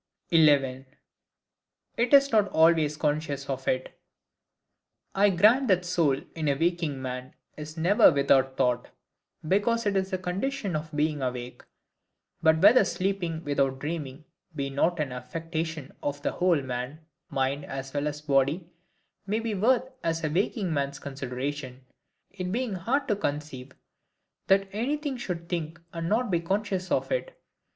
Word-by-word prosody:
11. 140 -5 +4 1.1
It 235 +1 0
is 280 0 +6
not 215 -3 +4
always 160 -3 +3
conscious 145 -2 -1
of 135 -1 -4
it. 130 0 -2 1.1
I 205 +1 +4
grant 215 +9 +4
that 185 -3 +3
the - - -7
soul, 160 -6 +2
in 160 -2 -3
a 140 - +3
waking 165 -2 0
man, 130 0 -6 0.2
is 155 +1 -8
never 175 +5 +6
without 135 -2 +2
thought, 125 -2 +1 0.6
because 220 +6 +2
it 205 -1 +1
is 190 0 0
the 190 - -1
condition 195 - -2
of 155 +1 -3
being 150 -1 0
awake. 125 -1 -4 0.8
But 160 +1 +3
whether 215 +3 +8
sleeping 180 -3 -2
without 140 -3 0
dreaming 150 -1 -5 0.3
be 140 -2 -3
not 165 +5 +1
an 145 -3 -1
affection 160 +3 -5
of 145 0 -3
the - - 0
whole 175 -6 +2
man, 130 +5 -5 0.2
mind 135 +2 -1
as 135 0 -6
well 145 0 -1
as 150 0 -4
body, 150 +4 +1 0.6
may 215 +3 0
be 230 -1 -2
worth 245 +6 +2 0.2
a 165 -1 -1
waking 190 0 0
man's 140 -1 -1
consideration; 135 -1 -5 0.5
it 185 -1 -5
being 240 0 -1
hard 235 +11 -1
to 210 - +2
conceive 145 -7 -4 0.7
that 195 0 +4
anything 280 +7 -2
should 175 -8 -5
think 170 -1 -4
and 165 0 -3
not 225 0 +1
be 170 - +2
conscious 190 +1 -2
of - - 0
it. - - -3
160 Hz, 150 wpm, -27 LUFS, 140-195 Hz, 1.1 s, whether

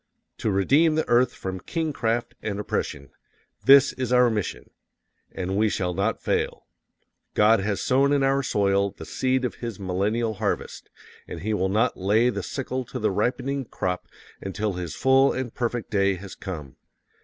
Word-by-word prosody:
To - - 0
redeem 140 - +3
the 160 - 0
earth 120 +1 +4
from 95 -1 -5
kingcraft 120 - -2
and 100 -2 -3
oppression 70 -8 -3 0.5
THIS 140 +1 +7
IS 130 -2 -3
OUR 125 -1 +5
MISSION! 105 -3 -4 0.6
AND 95 0 -3
WE 110 +1 +3
SHALL 90 -3 -1
NOT - - 0
FAIL._ - - -1 0.7
God 110 +1 +5
has 100 0 -1
sown 135 +2 +3
in 140 -1 +3
our 135 +1 +2
soil 100 -5 +1
the - - -8
seed 130 0 0
of 125 - -2
His 115 -5 -5
millennial 100 +5 -1
harvest, 105 0 -3 0.4
and - - -7
He 110 +2 -1
will 95 -2 0
not 110 +5 +1
lay 110 +6 +3
the - - -3
sickle 130 -1 -4
to 125 - -7
the 110 -4 0
ripening 130 +7 -1
crop 90 -4 -3 0.3
until 100 +1 -2
His 90 -4 -5
full 135 +7 +4
and 130 -3 -4
perfect 120 -1 -3
day 100 -2 +2
has 95 +1 -9
come. 75 -8 -7
110 Hz, 165 wpm, -25 LUFS, 95-130 Hz, 0.7 s, THIS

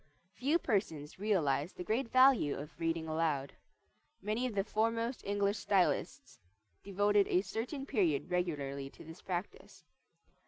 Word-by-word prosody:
Few 285 +9 +1
persons 185 - -2
realize 165 -7 +1
the - - -6
great 230 +5 -1
value 255 - +5
of 150 +3 -9
reading 165 -1 -1
aloud. 155 -4 -1 0.7
Many 215 +5 -1
of 230 - -6
the 195 - +2
foremost 230 +3 -1
English 200 +1 0
stylists 140 -9 0 0.4
devoted 205 +1 +2
a 180 - +3
certain 250 +7 -4
period 175 - 0
regularly 140 -6 -2
to - - -14
this 160 0 -11
practise. 180 +1 -6
195 Hz, 130 wpm, -33 LUFS, 155-220 Hz, 0.7 s, value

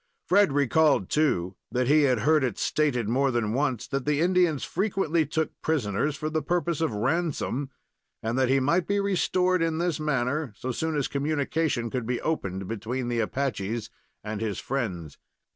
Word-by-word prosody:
Fred 200 -4 +4
recalled 145 - +3
too, 95 - +1
that 125 0 0
he 150 +2 +5
had 125 -4 +1
heard 155 +2 +3
it 120 -6 -1
stated 130 -8 0
more 135 +4 +2
than 115 -4 0
once 130 -3 0
that 135 0 -2
the 150 +1 +1
Indians 175 -4 +2
frequently 175 -5 0
took 160 +1 -1
prisoners 140 -1 0
for 155 - -4
the 155 0 -1
purpose 170 +1 -1
of 160 - +1
ransom, 135 +3 -1 0.5
and 115 +2 -1
that 130 -1 +2
he 135 +1 +4
might 165 +6 +1
be 200 0 +1
restored 185 -2 +1
in 165 -1 0
this 170 -2 -1
manner 140 -2 -1
so 130 - -3
soon 160 +5 -2
as 140 - 0
communication 145 -3 -1
could 125 -3 -3
be 125 -1 -1
opened 95 - -2
between 115 +4 -3
the 120 -1 0
Apaches 115 -2 -2 0.3
and 105 0 -4
his 105 -4 -2
friends. 95 - -4
140 Hz, 175 wpm, -26 LUFS, 120-160 Hz, 0.5 s, he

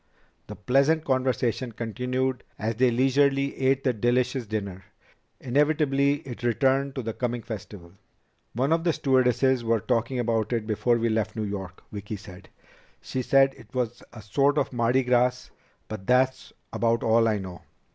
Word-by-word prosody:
The - - -8
pleasant 140 +9 +2
conversation 130 -2 0
continued 125 +3 -2
as 110 +2 -2
they 130 +1 +4
leisurely 135 +3 +2
ate 135 0 +1
the 130 - +2
delicious 120 +2 0
dinner. 100 -3 -4 0.6
Inevitably 145 +1 +1
it 120 -3 -8
returned 135 +3 +1
to 130 - -3
the 115 0 -3
coming 120 -1 -3
festival. 105 -6 -8 0.6
"One 135 +7 +1
of 165 0 0
the 170 -2 +2
stewardesses 130 -2 +2
was 115 -2 0
talking 120 +1 0
about 115 -1 0
it 115 -2 -1
before 115 +2 +1
we 115 0 0
left 110 -1 -1
New 110 - -2
York," 95 -3 -6
Vicki 105 +1 -6
said. 95 -2 -12 0.5
"She 130 - -4
said 135 +1 +4
it - - -17
was 120 -2 -2
a 110 -2 -11
sort 140 +8 +1
of - - 0
Mardi 120 +2 +2
Gras, 125 0 +1 0.4
but 100 -3 -8
that's 130 +1 +2 0.2
about 115 0 +1
all 115 0 +3
I 110 -2 +1
know." 95 -3 -8
125 Hz, 160 wpm, -26 LUFS, 110-130 Hz, 0.6 s, they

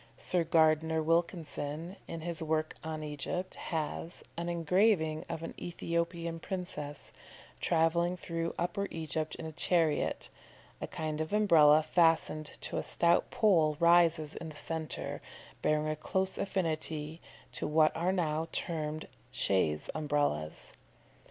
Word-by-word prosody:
Sir 180 -2 +1
Gardner 160 -1 +3
Wilkinson, 165 0 -1
in 165 - -5
his 170 -1 -3
work 155 0 0
on 155 -1 -4
Egypt, 150 +5 -4
has, 165 +1 -4
an 170 +1 -3
engraving 170 -1 +2
of 160 - -4
an - - -5
Ethiopian 170 -1 -2
princess 155 -6 -6 0.5
travelling 170 +2 +2
through 165 -1 -3
Upper 180 +3 -1
Egypt 155 -1 -3
in - - -7
a 160 - -5
chariot; 165 -1 +1 0.5
a - - -3
kind 155 -1 -3
of 155 +5 -3
Umbrella 155 -7 +6
fastened 160 -2 +2
to - - -3
a - - -1
stout 170 0 +2
pole 165 -9 +3
rises 170 -3 +4
in 165 - -6
the 155 - -10
centre, 160 +1 -4 0.4
bearing 155 0 +2
a 155 - 0
close 190 +5 -1
affinity 160 -4 -2 0.3
to - - -3
what 155 0 +4
are 175 +3 +1
now 160 -3 0
termed 155 -2 -3 0.2
chaise 95 -11 +1
Umbrellas. 145 - -1
160 Hz, 130 wpm, -32 LUFS, 155-170 Hz, 0.5 s, Umbrella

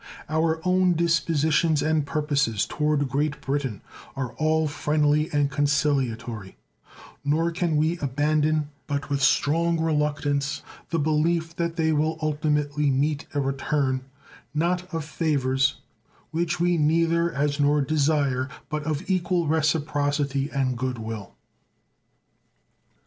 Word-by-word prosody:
Our 160 +1 +1
own 185 0 +3
dispositions 160 -1 +2
and 155 -2 +1
purposes 140 -8 0
toward 150 -2 0
Great 150 +2 -1
Britain 135 -7 -2 0.3
are 130 -3 -4
all 155 0 +1
friendly 150 +1 +1
and 145 -1 +1
conciliatory; 125 -8 -1 0.7
nor 160 +4 +1
can 165 -2 0
we 160 +3 +1
abandon 150 +2 +1 0.2
but 145 +1 -3
with 140 -1 0
strong 165 +4 +2
reluctance 145 -2 0 0.3
the 165 - 0
belief 160 +2 +1
that 170 -1 -1
they 160 -2 +1
will 155 +2 +1
ultimately 150 -1 0
meet 145 +2 0
a - - +2
return, 135 -1 0 0.5
not 180 +3 0
of 165 -3 -3
favors, 135 -4 +1 0.6
which 170 +1 -1
we 175 -1 +2
neither 165 +2 +2
as 145 0 -1
nor 145 +1 +3
desire, 140 -3 +1 0.2
but 150 0 -2
of 155 +3 -2
equal 180 -2 +1
reciprocity 145 -2 0
and 130 -4 -1
good 130 -1 -2
will. 110 -3 -7
150 Hz, 120 wpm, -25 LUFS, 140-160 Hz, 0.7 s, own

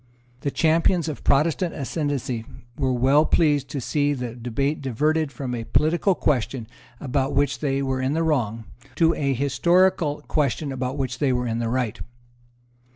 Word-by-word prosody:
The 140 - -2
champions 165 +3 +2
of 155 - -5
Protestant 160 +5 +2
ascendency 140 -5 -2 0.3
were 130 -2 0
well 135 +4 +4
pleased 145 -5 +2
to 140 - -3
see 145 +3 0
the 125 -4 -4
debate 125 +5 -2
diverted 150 +4 0
from 130 -3 -5
a 115 -2 -3
political 170 - +2
question 130 -5 0 0.3
about 135 0 -1
which 140 0 +1
they 140 -2 0
were 130 -1 -1
in 130 +2 0
the 165 +1 +1
wrong, 115 -8 0 0.3
to 165 +1 +4
a 140 -2 0
historical 150 +3 +2
question 145 -1 0
about 130 +1 -3
which 130 -2 -3
they 140 -3 +2
were 125 0 0
in 115 -1 -2
the 115 -1 -1
right. 125 -3 -1
140 Hz, 160 wpm, -24 LUFS, 125-155 Hz, 0.3 s, well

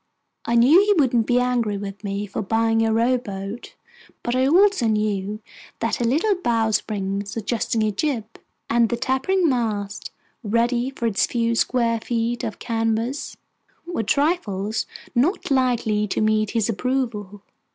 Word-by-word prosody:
I 235 - 0
knew 260 +9 +7
he 410 0 +3
wouldn't 245 -6 +2
be 245 0 +3
angry 240 -4 0
with 200 +1 -7
me 200 0 -3
for 200 - -4
buying 225 +2 +1
a 225 - +1
rowboat; 225 -2 -2 0.5
but 240 - -1
I 260 +1 +3
also 370 - +4
knew 210 -1 -1 0.4
that 230 - -1
the 240 - -1
little 325 - +2
bowsprit 215 - -1
suggesting 220 +1 -1
a 215 - +1
jib, 235 +1 -1 0.4
and 230 -1 +3
the 240 - -1
tapering 265 +9 +1
mast 215 -6 -2 0.3
ready 235 +3 +1
for 270 -3 -5
its 225 -1 +2
few 235 -1 0
square 230 -1 +1
feet 235 +1 -2
of 220 - -4
canvas, 225 +4 -2 0.5
were 345 -8 -2
trifles 220 - 0 0.3
not 285 +7 +1
likely 235 -5 +1
to - - -2
meet 215 -1 +2
his 225 -1 0
approval. 225 -4 -2
230 Hz, 145 wpm, -22 LUFS, 215-250 Hz, 0.5 s, knew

